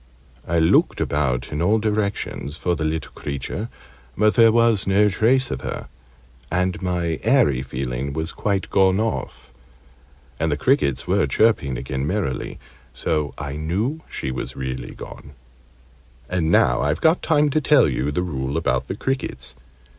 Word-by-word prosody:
I 85 Hz, -, +1 dB
looked 80 Hz, 0 st, +3 dB
about 65 Hz, -4 st, -1 dB
in 75 Hz, +1 st, -2 dB
all 105 Hz, +6 st, +3 dB
directions 105 Hz, -8 st, -2 dB
for 90 Hz, +1 st, 0 dB
the 80 Hz, -, -3 dB
little 80 Hz, +1 st, -2 dB
creature, 70 Hz, -, -5 dB, 0.5 s
but 105 Hz, +1 st, +4 dB
there 115 Hz, -2 st, +6 dB
was 115 Hz, -3 st, +3 dB
no 100 Hz, +2 st, +4 dB
trace 120 Hz, +7 st, +2 dB
of -, -, -3 dB
her -, -, -5 dB, 0.6 s
and 90 Hz, +2 st, 0 dB
my 90 Hz, -3 st, -1 dB
'eerie' 110 Hz, -, +3 dB
feeling 65 Hz, 0 st, -4 dB
was 80 Hz, +4 st, -3 dB
quite 100 Hz, -2 st, -2 dB
gone 95 Hz, 0 st, +4 dB
off, 110 Hz, -, -3 dB, 0.9 s
and 80 Hz, 0 st, 0 dB
the 75 Hz, -, 0 dB
crickets 125 Hz, -, +1 dB
were -, -, +2 dB
chirping 70 Hz, -, +2 dB
again 65 Hz, +2 st, -3 dB
merrily 85 Hz, -9 st, -2 dB, 0.4 s
so 75 Hz, 0 st, -1 dB
I 70 Hz, 0 st, -5 dB
knew 105 Hz, -, -2 dB
she 65 Hz, -, -4 dB
was 65 Hz, -, -5 dB
really 65 Hz, -1 st, -5 dB
gone. 70 Hz, -, -10 dB, 0.9 s
And 90 Hz, -3 st, 0 dB
now 60 Hz, -6 st, +4 dB
I've 75 Hz, +3 st, 0 dB
got 160 Hz, +2 st, +3 dB
time 150 Hz, -2 st, +2 dB
to 155 Hz, -, +1 dB
tell 145 Hz, -3 st, +5 dB
you 65 Hz, 0 st, -1 dB
the 90 Hz, +5 st, -1 dB
rule 70 Hz, -4 st, -3 dB
about -, -, 0 dB
the -, -, -3 dB
crickets. 70 Hz, -, -3 dB
85 Hz, 155 wpm, -22 LUFS, 70-110 Hz, 0.9 s, there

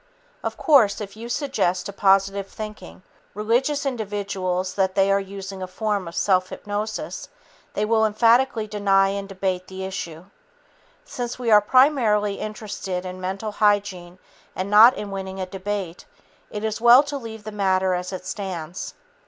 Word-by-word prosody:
Of -, -, -3 dB
course, 255 Hz, -, +4 dB
if 205 Hz, -1 st, -7 dB
you 230 Hz, +2 st, -8 dB
suggest 210 Hz, -, -1 dB
to 200 Hz, -, -6 dB
positive 195 Hz, 0 st, +2 dB
thinking, 210 Hz, -3 st, -9 dB, 0.3 s
religious 245 Hz, +8 st, 0 dB
individuals 200 Hz, -6 st, -2 dB
that 190 Hz, -1 st, 0 dB
they 195 Hz, 0 st, +3 dB
are 200 Hz, -, +3 dB
using 195 Hz, 0 st, -7 dB
a 185 Hz, -, -4 dB
form 200 Hz, 0 st, -2 dB
of 170 Hz, -, -8 dB
self 185 Hz, -2 st, +2 dB
hypnosis, 210 Hz, +1 st, -5 dB, 0.5 s
they 210 Hz, -, +1 dB
will 220 Hz, 0 st, +2 dB
emphatically 230 Hz, +2 st, +3 dB
deny 200 Hz, -2 st, +2 dB
and 200 Hz, 0 st, -4 dB
debate 185 Hz, -1 st, -2 dB
the 190 Hz, 0 st, -7 dB
issue. 175 Hz, -3 st, -6 dB, 0.8 s
Since 245 Hz, -1 st, -5 dB
we 240 Hz, -3 st, -1 dB
are 210 Hz, -1 st, +8 dB
primarily 215 Hz, -5 st, +3 dB
interested 205 Hz, -4 st, -5 dB
in 185 Hz, 0 st, -7 dB
mental 195 Hz, +4 st, -3 dB
hygiene 200 Hz, -4 st, 0 dB, 0.4 s
and 190 Hz, +2 st, -3 dB
not 225 Hz, +5 st, +8 dB
in 205 Hz, -1 st, -5 dB
winning 190 Hz, 0 st, -5 dB
a 185 Hz, -, -2 dB
debate, 190 Hz, -1 st, -5 dB, 0.4 s
it 210 Hz, 0 st, -6 dB
is 220 Hz, 0 st, -2 dB
well 240 Hz, +3 st, +8 dB
to 290 Hz, 0 st, -5 dB
leave 225 Hz, -4 st, -8 dB
the 215 Hz, -, -7 dB
matter 190 Hz, -2 st, +1 dB
as 180 Hz, +1 st, -3 dB
it 185 Hz, -1 st, -6 dB
stands. 185 Hz, -3 st, -5 dB
200 Hz, 160 wpm, -23 LUFS, 190-215 Hz, 0.8 s, are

